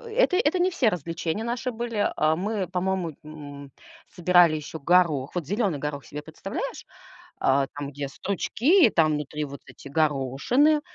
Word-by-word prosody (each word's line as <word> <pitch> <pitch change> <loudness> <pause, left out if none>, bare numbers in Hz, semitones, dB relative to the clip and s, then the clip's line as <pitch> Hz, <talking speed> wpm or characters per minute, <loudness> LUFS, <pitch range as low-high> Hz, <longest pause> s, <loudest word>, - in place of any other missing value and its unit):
это 485 -7 +3
это 375 -4 +2
не 370 +1 +2
все 255 -8 +1
развлечения 165 +3 -3
наши 245 +2 -2
были, 230 -2 -1
а. 155 +1 +2
Мы, 200 -1 -2
по-моему, 180 -2 -2
м, 145 -2 -10 0.4
собирали 175 -3 +4
еще 155 +1 -6
горох. 155 -3 +2
Вот 170 -5 -2
зеленый 200 - 0
горох 145 -1 -4
себе 150 - -7
представляешь, 195 - -6 0.5
а? 135 +1 +2
Там 145 -1 -5
где 145 0 -5
стручки 235 - +2
там 155 -4 +3
внутри, 150 +1 -3
вот 140 -1 -8
эти - - -15
горошины, 155 - +2
170 Hz, 155 wpm, -25 LUFS, 145-220 Hz, 0.5 s, собирали